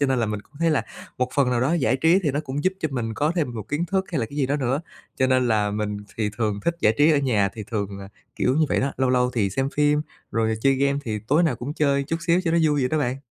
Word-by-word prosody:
cho 140 - +3
nên 130 -2 +1
là 115 - +1
mình 105 -1 -3
cũng - - -32
thấy 165 -1 +3
là 150 - +2 0.4
một 125 - +1
phần 135 -3 +3
nào 120 -1 +1
đó 135 +6 +1
giải 135 -4 +2
trí 165 +7 +4
thì 150 - +1
nó 145 +3 -1
cũng 140 +3 -4
giúp 185 - +3
cho 155 - 0
mình 115 -3 -2
có 150 +7 +1
thêm 125 -8 -1
một 110 -1 -7
kiến 150 +4 -1
thức 190 +2 0
hay 155 - 0
là 115 - -1
cái 145 - -11
gì 135 -3 +1
đó 145 +2 0
nữa. 135 +2 0 0.4
Cho 130 - +2
nên 130 -1 +2
là 105 -2 +2
mình 105 0 -2 0.2
thì 105 -2 -1
thường 105 -3 -1
thích 170 - +1
giải 110 +1 +3
trí 150 +2 +6
ở 145 - +3
nhà, 110 -8 +2
thì 110 -2 -6
thường 100 -2 -3
là 100 0 -9 0.3
kiểu 125 - +1
như 155 -1 +3
vậy - - +1
đó, 135 +1 -1
lâu 130 -1 +1
lâu 125 0 +2
thì 100 -4 +1
xem 135 +7 -1
phim, 150 0 +3 0.3
rồi 110 -1 +1
chơi 135 +2 +3
game 140 +1 +1
thì 110 -2 -2
tối 155 +5 +4
nào 150 -8 +1
cũng 140 +5 -5
chơi 140 -2 +2
chút 165 - -2
xíu 170 +2 +4
cho 165 - +1
nó 170 - +3
vui 150 -2 +2
vậy 125 - +1
đó 155 - 0
bạn. 130 -2 -1
130 Hz, 310 wpm, -24 LUFS, 115-150 Hz, 0.4 s, trí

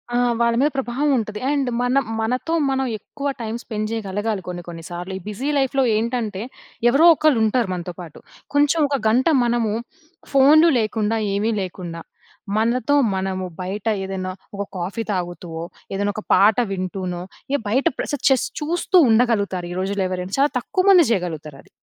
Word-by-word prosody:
ఆ! - - +3 0.2
వాళ్ళ 235 0 +3
మీద 290 +2 +4
ప్రభావం 270 +3 0
ఉంటది. 210 -2 -3
అండ్ 280 -3 +1
మనం 260 +2 +2 0.2
మనతో 250 +8 -1 0.2
మనం 265 0 0
ఎక్కువ 280 +7 -6
టైం 225 0 -3
స్పెండ్ 215 -1 -3
చేయగలగాలి. 205 -1 -2
కొన్ని 175 -1 -5
కొన్ని 165 -1 -8
సార్లు 175 +2 -6
ఈ - - -7
బిజీ 245 +8 -3
లైఫ్‍లో 270 0 +2
ఏంటంటే 220 -3 -2 0.5
ఎవరో 290 +7 +5
ఒకళ్ళు 295 -7 +3
ఉంటారు 230 0 +1
మనతో 175 0 -5
పాటు. 165 -4 -11 0.3
కొంచెం 290 +3 +3
ఒక 280 -1 0
గంట 250 +7 +3 0.2
మనము 235 -3 +1 0.6
ఫోన్‌లు 300 +5 +6
లేకుండా, 220 0 0 0.2
ఏమీ 215 +3 0
లేకుండా 175 -2 -6 0.6
మనతో 235 +5 +1 0.2
మనము 190 -1 -2 0.2
బయట 195 +4 -4 0.2
ఏదైనా 190 -1 -4 0.2
ఒక 200 - -2
కాఫీ 190 +6 -3
తాగుతూ 175 -1 -4
ఓహ్! 170 - -6 0.2
ఏదైనా 205 +1 0
ఒక 215 - -5
పాట 210 +3 +5
వింటూనో 185 -1 -3 0.4
ఎ - - -7
బయట 260 +8 +1
ప్ర - - -3 0.2
జస్ట్ 265 -2 +2
చూస్తూ 345 +4 +1
ఉండగలుగుతారు. 205 -6 +2
ఈ - - -6
రోజుల్లో 195 0 -1
ఎవరైనా 185 +1 -3
చాలా 285 +1 +4
తక్కువమంది 370 +3 +4
చేయగలుగుతారు 160 -7 -3
అది. - - -24
215 Hz, 160 wpm, -21 LUFS, 190-260 Hz, 0.6 s, ఫోన్‌లు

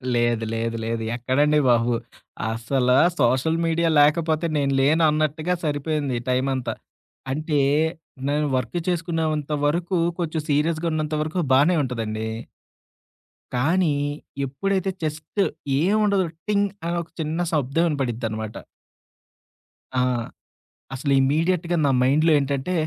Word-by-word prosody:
లేదు. 120 -1 +1
లేదు. 115 0 -2
లేదు. 115 0 -2
ఎక్కడండి 145 +5 +2
బాబు. 120 0 +3 0.6
అస్సల 125 +3 -1 0.3
సోషల్ 130 +7 +2
మీడియా 165 0 +1
లేకపోతే 155 +2 +3
నేను 140 -1 +1
లేను 155 +4 +3
అన్నట్టుగా 155 +3 0
సరిపోయింది 145 -3 -1
టైమంతా. 130 0 0 0.6
అంటే 150 +1 0 0.7
నేను 150 +1 +1
వర్క్ 130 +7 -1
చేసుకున్నంత 160 -4 -1
వరకు 170 +4 0 0.2
కొంచెం 160 -2 -1
సీరియస్‌గున్నంత 155 +1 0
వరకు 155 +4 -2
బానే 150 +7 +5
ఉంటదండి. 110 -4 -3 1.3
కానీ 160 +4 +2 0.5
ఎప్పుడైతే 190 +8 -1
జస్టు 155 +6 -2 0.4
ఏముండదు 200 +1 +2 0.2
టింగ్ 205 -1 +2 0.2
అని 170 - -1
ఒక 170 - -11
చిన్న 155 +2 -2
శబ్దం 150 +1 +1
వినపడిద్దనమాట. 115 -6 -3 1.4
ఆ! - - +3 0.9
అసలు 140 +2 -2
ఇమీడియట్‌గా 165 +5 +1
నా 140 - +3
మైండ్‌లో 150 +6 +3
ఏంటంటే 140 +5 -2
150 Hz, 105 wpm, -23 LUFS, 130-165 Hz, 1.4 s, బానే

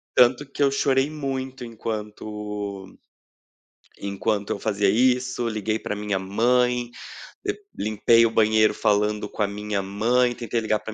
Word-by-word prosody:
Tanto 130 +3 +4
que 145 - -1
eu 140 - +4
chorei 135 0 +2
muito 135 -4 -4
enquanto 105 -3 -6 1.0
enquanto 100 +1 -2
eu - - -2
fazia 100 -2 +1
isso, 125 +2 +2
liguei 110 -1 -1
pra 105 - -4
minha 105 -2 -2
mãe, 120 +5 +1 0.6
de - - -1 0.2
limpei 110 +2 +3
o - - +3
banheiro 110 -1 +4
falando 105 0 +1
com - - -6
a 105 - +3
minha 105 0 -3
mãe, 120 +6 +1
tentei 115 -1 -2
ligar 110 -1 0
para 110 0 -7
110 Hz, 145 wpm, -24 LUFS, 105-125 Hz, 1.0 s, Tanto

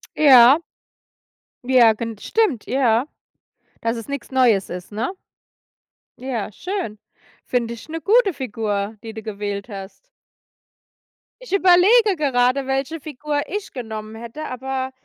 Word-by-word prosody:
Ja. 270 -1 +7 1.0
Ja, 245 -3 +5
gen 225 0 -6
stimmt, 360 - 0
ja, 250 -1 +2 0.7
dass 230 +1 -1
es 230 - -8
nix 280 -2 -6
Neues 240 -7 +3
ist, 180 +3 -7
ne? 220 - -2 1.1
Ja, 245 -5 -4
schön. 360 - -5 0.5
Finde 235 -2 -1
ich 235 +6 -12
'ne 325 +1 -4
gute 410 - +3
Figur, 215 -5 -3
die 225 -1 -7
du 220 0 -8
gewählt 205 0 -5
hast. 195 -1 -8 1.5
Ich - - -9
überlege 395 +3 +5
gerade, 265 -2 +1
welche 270 +4 -2
Figur 295 0 -3
ich 410 +2 -5
genommen 220 -3 -7
hätte, 235 +7 -8
aber 260 +1 -4
250 Hz, 125 wpm, -21 LUFS, 220-300 Hz, 1.5 s, Ja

